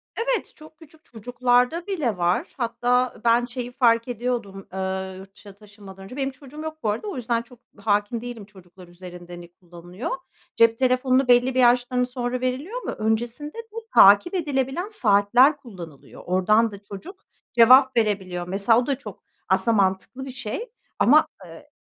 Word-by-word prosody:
Evet, -, -, -2 dB
çok 310 Hz, 0 st, -16 dB
küçük 315 Hz, 0 st, -19 dB
çocuklarda 245 Hz, -, 0 dB
bile 280 Hz, -, -2 dB
var. 175 Hz, +1 st, -1 dB
Hatta 245 Hz, +1 st, 0 dB
ben 235 Hz, +1 st, +3 dB
şeyi 245 Hz, 0 st, -6 dB
fark 230 Hz, -1 st, +2 dB
ediyordum. 235 Hz, -5 st, -4 dB
Eee, 190 Hz, 0 st, -4 dB
yurt 195 Hz, +1 st, -13 dB
dışına 200 Hz, -1 st, -14 dB
taşınmadan 200 Hz, -2 st, -14 dB
önce. 220 Hz, +7 st, -10 dB
Benim 270 Hz, 0 st, -2 dB
çocuğum 280 Hz, +3 st, -12 dB
yok 315 Hz, 0 st, -6 dB
bu 215 Hz, -, 0 dB
arada 220 Hz, -, -3 dB
o 400 Hz, -, -5 dB
yüzden 235 Hz, -2 st, -1 dB
çok 240 Hz, 0 st, -18 dB, 0.2 s
hâkim 205 Hz, +2 st, -1 dB
değilim 240 Hz, -4 st, -8 dB
çocuklar 185 Hz, -3 st, -17 dB
üzerinde 175 Hz, 0 st, -12 dB
hani 175 Hz, 0 st, -9 dB
ne 170 Hz, -, -21 dB
kullanılıyor. 175 Hz, +4 st, -9 dB, 0.5 s
Cep 230 Hz, 0 st, +4 dB
telefonunu 255 Hz, 0 st, +2 dB
belli 245 Hz, +1 st, +4 dB
bir -, -, +2 dB
yaştan 250 Hz, 0 st, +3 dB
sonra 250 Hz, 0 st, -3 dB
veriliyor 290 Hz, -, -3 dB
ama -, -, -3 dB
öncesinde 235 Hz, -, -3 dB
de 455 Hz, -1 st, -10 dB, 0.2 s
takip 205 Hz, -, +7 dB
edilebilen 290 Hz, +1 st, -2 dB
saatler 245 Hz, -, +3 dB
kullanılıyor. 180 Hz, -, -12 dB
Oradan 210 Hz, +5 st, +2 dB
da 200 Hz, 0 st, -11 dB
çocuk 260 Hz, -, -11 dB, 0.3 s
cevap 255 Hz, +2 st, +6 dB
verebiliyor. 190 Hz, -5 st, -1 dB
Mesela 200 Hz, +5 st, +2 dB
o 245 Hz, -, -2 dB
da 275 Hz, -2 st, 0 dB
çok 280 Hz, -, -11 dB, 0.3 s
aslında 230 Hz, -2 st, +2 dB
mantıklı 195 Hz, +7 st, -1 dB
bir 265 Hz, -, -7 dB
şey 265 Hz, -, -6 dB, 0.3 s
ama, 310 Hz, +5 st, +5 dB, 0.2 s
eee. 170 Hz, -, -14 dB
240 Hz, 165 wpm, -23 LUFS, 200-265 Hz, 0.5 s, takip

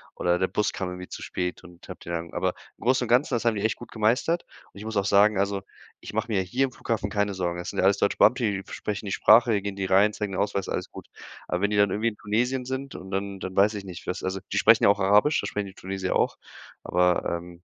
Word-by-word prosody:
oder 90 Hz, 0 st, +1 dB
der 95 Hz, -, +2 dB
Bus 105 Hz, -, -1 dB
kam 95 Hz, -, -3 dB
irgendwie 90 Hz, 0 st, -7 dB
zu -, -, -8 dB
spät 90 Hz, 0 st, -4 dB
und 85 Hz, -1 st, -15 dB
habe -, -, -8 dB
die -, -, -9 dB
dann 85 Hz, 0 st, -4 dB
aber -, -, 0 dB, 0.2 s
im -, -, -13 dB
Großen 130 Hz, 0 st, +3 dB
und 115 Hz, -, -9 dB
Ganzen, 125 Hz, +3 st, +3 dB
das 120 Hz, -, -2 dB
haben 115 Hz, -2 st, +3 dB
die 100 Hz, -, -3 dB
echt 110 Hz, -, +1 dB
gut 120 Hz, -, -12 dB
gemeistert. 120 Hz, +10 st, +1 dB, 0.3 s
Und -, -, -17 dB
ich 105 Hz, -, -8 dB
muss 110 Hz, -, -5 dB
auch 100 Hz, -, +1 dB
sagen, 100 Hz, +1 st, +4 dB
also, 100 Hz, 0 st, 0 dB, 0.4 s
ich -, -, -9 dB
mache 110 Hz, +2 st, -2 dB
mir 100 Hz, -3 st, +2 dB
hier 110 Hz, +9 st, -1 dB
im 130 Hz, -, -6 dB
Flughafen 110 Hz, -4 st, -3 dB
keine 105 Hz, -1 st, 0 dB
Sorgen. 85 Hz, -1 st, -2 dB
Es 90 Hz, -, -5 dB
sind -, -, -5 dB
ja -, -, +2 dB
alles 100 Hz, 0 st, +4 dB
Deutsche 100 Hz, -, 0 dB
Beamte, 125 Hz, 0 st, +4 dB
die 100 Hz, -3 st, -1 dB
sprechen 105 Hz, 0 st, -4 dB
die 95 Hz, -, -3 dB
Sprache, 110 Hz, 0 st, +5 dB
gehen 100 Hz, 0 st, -4 dB
die 95 Hz, -1 st, -2 dB
rein, 100 Hz, +3 st, +4 dB
zeigen 105 Hz, -2 st, -4 dB
den 95 Hz, -, 0 dB
Ausweis, 100 Hz, -1 st, -2 dB
alles -, -, -3 dB
gut. -, -, -11 dB, 0.4 s
Aber 90 Hz, +1 st, -2 dB
wenn 100 Hz, -, +2 dB
die 105 Hz, -, +1 dB
dann 100 Hz, -1 st, +4 dB
irgendwie 110 Hz, +4 st, +1 dB
in 105 Hz, -, -12 dB
Tunesien 125 Hz, +5 st, -1 dB
sind 130 Hz, +1 st, -5 dB
und 95 Hz, +1 st, -9 dB
dann 100 Hz, 0 st, -3 dB
dann 95 Hz, 0 st, -6 dB
weiß 105 Hz, +2 st, +4 dB
ich 100 Hz, -, -5 dB
nicht, 90 Hz, -2 st, -9 dB
was 90 Hz, -, -3 dB
also, 95 Hz, +1 st, -2 dB
die -, -, -1 dB
sprechen -, -, +5 dB
ja -, -, +7 dB
auch 100 Hz, 0 st, +3 dB
Arabisch, 105 Hz, +10 st, +4 dB
das -, -, -4 dB
sprechen 105 Hz, -1 st, -3 dB
die 95 Hz, -, -11 dB
Tunesier 95 Hz, 0 st, -3 dB
auch, -, -, +1 dB, 0.5 s
aber, 90 Hz, -1 st, +2 dB
ähm 85 Hz, 0 st, -12 dB
100 Hz, 275 wpm, -26 LUFS, 95-110 Hz, 0.5 s, ja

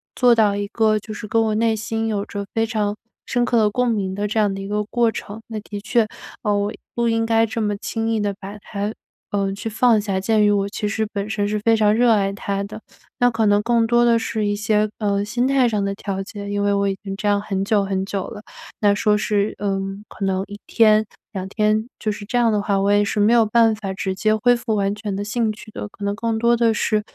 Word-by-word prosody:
做 245 Hz, -2 st, +5 dB
到 210 Hz, -3 st, +3 dB
一 205 Hz, 0 st, -2 dB
个 215 Hz, 0 st, +2 dB
就 215 Hz, +1 st, -8 dB
是 215 Hz, -, -7 dB
跟 225 Hz, +2 st, +2 dB
我 220 Hz, -1 st, +1 dB
内 225 Hz, 0 st, +2 dB
心 225 Hz, +1 st, -2 dB
有 205 Hz, -2 st, -1 dB
着 200 Hz, -2 st, -5 dB
非 225 Hz, 0 st, +1 dB
常 215 Hz, -2 st, -1 dB, 0.3 s
深 245 Hz, 0 st, 0 dB
刻 240 Hz, -, +1 dB
的 215 Hz, -2 st, +4 dB
共 250 Hz, +2 st, +1 dB
鸣 195 Hz, -4 st, -1 dB
的 205 Hz, +1 st, -1 dB
这 215 Hz, +2 st, -1 dB
样 205 Hz, -2 st, +2 dB
的 195 Hz, -, -5 dB
一 195 Hz, -, -6 dB
个 210 Hz, +1 st, -1 dB
过 235 Hz, 0 st, +1 dB
程。 215 Hz, +1 st, -7 dB
那 220 Hz, -2 st, -5 dB
的 205 Hz, -1 st, -7 dB
确， 225 Hz, 0 st, +2 dB, 0.4 s
呃， 210 Hz, -1 st, +2 dB
我 205 Hz, +1 st, 0 dB, 0.2 s
不 235 Hz, -1 st, +1 dB
应 225 Hz, 0 st, +1 dB
该 225 Hz, 0 st, +3 dB
这 225 Hz, +1 st, -3 dB
么 210 Hz, -1 st, 0 dB
轻 225 Hz, +2 st, -3 dB
易 220 Hz, -, +1 dB
地 205 Hz, -1 st, -1 dB
把 200 Hz, +2 st, -8 dB
它， 205 Hz, +1 st, -4 dB, 0.4 s
呃， 200 Hz, -1 st, 0 dB
去 215 Hz, +3 st, -5 dB
放 225 Hz, 0 st, +3 dB
下。 195 Hz, -2 st, -1 dB
鉴 215 Hz, +1 st, +2 dB
于 205 Hz, -, +4 dB
我 200 Hz, -1 st, +1 dB
其 210 Hz, -, -3 dB
实 220 Hz, 0 st, -1 dB
本 200 Hz, 0 st, -3 dB
身 205 Hz, -2 st, -1 dB
是 210 Hz, 0 st, -1 dB
非 225 Hz, +2 st, +3 dB
常 210 Hz, -1 st, +4 dB
热 240 Hz, 0 st, +4 dB
爱 200 Hz, -2 st, +2 dB
它 200 Hz, 0 st, -3 dB
的， 215 Hz, +2 st, -9 dB, 0.4 s
那 245 Hz, 0 st, +5 dB
可 225 Hz, -1 st, +1 dB
能 205 Hz, 0 st, +4 dB
更 230 Hz, 0 st, +2 dB
多 240 Hz, +1 st, +4 dB
的 230 Hz, -1 st, +4 dB
是 220 Hz, -1 st, -2 dB
一 205 Hz, -, +1 dB
些， 215 Hz, 0 st, +1 dB
呃， 200 Hz, -1 st, 0 dB
心 240 Hz, +5 st, 0 dB
态 270 Hz, -2 st, +3 dB
上 210 Hz, -2 st, 0 dB
的 200 Hz, 0 st, -2 dB
调 195 Hz, -2 st, -4 dB
节。 200 Hz, 0 st, -8 dB
因 205 Hz, 0 st, -1 dB
为 205 Hz, 0 st, +2 dB
我 200 Hz, 0 st, +1 dB
已 195 Hz, -, -3 dB
经 195 Hz, -1 st, -5 dB
这 210 Hz, +1 st, -3 dB
样 205 Hz, -, +3 dB
很 195 Hz, -2 st, -2 dB
久 205 Hz, -1 st, +2 dB
很 190 Hz, 0 st, -1 dB
久 195 Hz, -1 st, -3 dB
了， 210 Hz, -2 st, -9 dB, 0.4 s
那 205 Hz, -1 st, +5 dB
说 210 Hz, 0 st, +2 dB
是， 205 Hz, 0 st, 0 dB
呃， 195 Hz, -1 st, -1 dB, 0.3 s
可 200 Hz, -, -4 dB
能 190 Hz, 0 st, 0 dB
1 205 Hz, 0 st, -9 dB
天、 215 Hz, -1 st, +4 dB, 0.3 s
2 190 Hz, -1 st, -4 dB
天 215 Hz, +2 st, +1 dB
就 215 Hz, -, -1 dB
是 205 Hz, 0 st, -7 dB
这 245 Hz, +4 st, -1 dB
样 235 Hz, -2 st, +3 dB
的 210 Hz, -1 st, +1 dB
话， 200 Hz, -1 st, 0 dB
我 200 Hz, -, +2 dB
也 205 Hz, 0 st, +4 dB
是 210 Hz, -, -2 dB
没 215 Hz, +3 st, +4 dB
有 230 Hz, -2 st, +5 dB
办 225 Hz, 0 st, +4 dB
法 195 Hz, -3 st, -5 dB
直 190 Hz, 0 st, -2 dB
接 215 Hz, +3 st, +2 dB
恢 245 Hz, +3 st, +4 dB
复 230 Hz, -2 st, -2 dB
完 200 Hz, -1 st, +1 dB
全 210 Hz, -2 st, -4 dB
的 200 Hz, -, -3 dB
兴 220 Hz, +1 st, 0 dB
趣 215 Hz, 0 st, -13 dB
的。 210 Hz, -, -6 dB
可 205 Hz, -, -12 dB
能 200 Hz, 0 st, 0 dB
更 230 Hz, 0 st, -1 dB
多 235 Hz, +1 st, +3 dB
的 230 Hz, -1 st, +3 dB
是， 215 Hz, 0 st, +1 dB
210 Hz, 275 characters per minute, -21 LUFS, 200-225 Hz, 0.4 s, 做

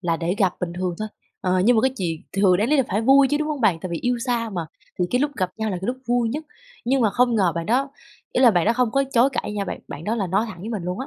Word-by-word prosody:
là 170 Hz, -3 st, 0 dB
để 175 Hz, +2 st, -1 dB
gặp 190 Hz, -3 st, +3 dB
bình 175 Hz, -1 st, -3 dB
thường 180 Hz, -1 st, -2 dB
thôi. 215 Hz, 0 st, -3 dB, 0.3 s
Ờ, 185 Hz, -1 st, +1 dB
nhưng 240 Hz, 0 st, +5 dB
mà -, -, +4 dB
cái 265 Hz, -, +3 dB
chuyện 165 Hz, -4 st, -3 dB
thường 195 Hz, -2 st, +4 dB
đáng 215 Hz, +5 st, 0 dB
lý 300 Hz, -, +3 dB
là 270 Hz, -, +4 dB
phải 200 Hz, +3 st, 0 dB
vui 270 Hz, +3 st, +5 dB
chứ, 295 Hz, -, +2 dB
đúng 305 Hz, 0 st, -2 dB
hông 295 Hz, -3 st, -3 dB
bạn? 185 Hz, -7 st, +2 dB
Tại 185 Hz, -, -5 dB
vì 170 Hz, -, -2 dB
yêu 245 Hz, 0 st, 0 dB
xa 235 Hz, -2 st, -1 dB
mà 175 Hz, -5 st, -4 dB, 0.3 s
thì 180 Hz, -, +2 dB
cái 250 Hz, -, +2 dB
lúc 290 Hz, 0 st, +1 dB
gặp 185 Hz, -2 st, -1 dB
nhau 220 Hz, -1 st, -2 dB
là 185 Hz, -, -2 dB
cái 190 Hz, -, -4 dB
lúc 250 Hz, +1 st, -1 dB
vui 240 Hz, -1 st, +2 dB
nhất, 300 Hz, +6 st, -4 dB, 0.4 s
nhưng 265 Hz, +2 st, +2 dB
mà 220 Hz, -4 st, +3 dB
không 245 Hz, 0 st, +2 dB
ngờ 185 Hz, -6 st, +2 dB
bạn 170 Hz, 0 st, -3 dB
đó 270 Hz, +4 st, +1 dB, 0.4 s
ý -, -, +1 dB
là 245 Hz, -, +8 dB
bạn 175 Hz, -5 st, +2 dB
đó 230 Hz, -, +4 dB
không 245 Hz, -2 st, +1 dB
có 275 Hz, +3 st, +2 dB
chối 250 Hz, +3 st, +4 dB
cãi 210 Hz, -, -3 dB
nha 205 Hz, -1 st, -2 dB
bạn, -, -, -5 dB
bạn 150 Hz, -, -8 dB
đó 215 Hz, -, 0 dB
là 205 Hz, -5 st, -1 dB
nói 195 Hz, +5 st, +1 dB
thẳng 185 Hz, -5 st, -9 dB
với 215 Hz, -, -6 dB
mình 210 Hz, -5 st, -3 dB
luôn 180 Hz, +4 st, -4 dB
á, 265 Hz, -, -4 dB
215 Hz, 330 wpm, -23 LUFS, 180-250 Hz, 0.4 s, là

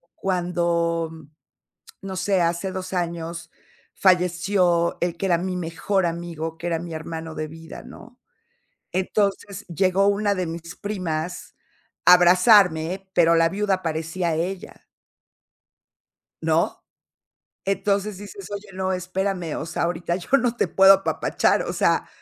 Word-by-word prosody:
cuando 170 Hz, -2 st, 0 dB, 0.9 s
no 190 Hz, -1 st, -6 dB
sé, 185 Hz, 0 st, +1 dB
hace 170 Hz, +3 st, -1 dB
2 185 Hz, 0 st, -6 dB
años 170 Hz, -1 st, -4 dB, 0.4 s
falleció 180 Hz, -1 st, +2 dB
el 175 Hz, -1 st, -1 dB
que 195 Hz, -, -2 dB
era 175 Hz, -3 st, +3 dB
mi 180 Hz, +1 st, -3 dB
mejor 175 Hz, +2 st, -1 dB
amigo, 165 Hz, -1 st, -4 dB
que 175 Hz, +1 st, -4 dB
era 165 Hz, -, 0 dB
mi 170 Hz, -1 st, -7 dB
hermano 160 Hz, 0 st, -6 dB
de 155 Hz, 0 st, -4 dB
vida, 160 Hz, +1 st, -10 dB
¿no?, 245 Hz, +1 st, -14 dB, 0.7 s
entonces 200 Hz, +1 st, -1 dB
llegó 185 Hz, +3 st, +2 dB
una 205 Hz, 0 st, +2 dB
de 180 Hz, -2 st, -1 dB
mis 170 Hz, +1 st, -7 dB
primas 180 Hz, -4 st, -4 dB, 0.5 s
a 180 Hz, -, +10 dB
abrazarme, 180 Hz, 0 st, +4 dB
pero 170 Hz, -1 st, +5 dB
la 165 Hz, 0 st, +4 dB
viuda 195 Hz, 0 st, -1 dB
parecía 165 Hz, +1 st, -2 dB
ella. 180 Hz, +4 st, -5 dB, 1.6 s
¿No? -, -, 0 dB, 0.8 s
Entonces 200 Hz, +1 st, -1 dB
dices: 200 Hz, -2 st, -9 dB
"Oye, 205 Hz, 0 st, -6 dB
no, 190 Hz, 0 st, -2 dB
espérame. 185 Hz, -2 st, -2 dB
O 155 Hz, -, -4 dB
sea, -, -, -3 dB
ahorita 170 Hz, 0 st, -1 dB
yo 180 Hz, -, -10 dB
no 245 Hz, -2 st, 0 dB
te -, -, +1 dB
puedo 195 Hz, 0 st, +7 dB
apapachar. 195 Hz, -, +1 dB
O -, -, -4 dB
sea -, -, +1 dB
180 Hz, 130 wpm, -23 LUFS, 170-195 Hz, 1.6 s, a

